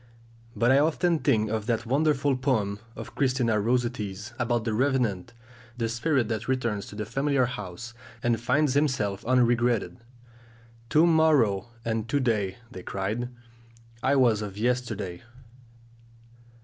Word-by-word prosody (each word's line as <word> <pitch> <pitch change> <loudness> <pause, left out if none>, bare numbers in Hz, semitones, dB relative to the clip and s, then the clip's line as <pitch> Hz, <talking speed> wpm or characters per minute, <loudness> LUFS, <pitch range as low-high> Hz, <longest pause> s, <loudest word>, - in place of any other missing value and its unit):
But 120 +2 +3
I 135 - +6
often 165 +2 +2
think 110 -5 +1
of 110 -1 -2
that 115 -1 0
wonderful 140 +1 +2
poem 110 -7 0 0.2
of - - -8
Christina 125 -5 +1
Rossetti's 115 -2 -2
about 120 -1 0
the 110 -1 -1
revenant, 120 -6 0 0.4
the 115 -2 -1
spirit 120 +2 0
that 110 -3 -3
returns 120 -6 -1
to - - -10
the 105 0 -4
familiar 135 +3 +1
house, 120 0 -7 0.3
and 115 -1 +1
finds 140 +3 +2
himself 120 -8 0
unregretted: 120 -1 +2 0.9
"'To 155 +5 +5
morrow' 150 - +3 0.2
and 115 0 -2
'to 145 - +1
day,' 105 -7 0
they 95 - -8
cried; 105 +7 -3 0.7
I 135 +3 +2
was 120 -5 +3
of 100 -2 -6
yesterday!" 110 -6 -2
120 Hz, 135 wpm, -27 LUFS, 105-130 Hz, 0.9 s, I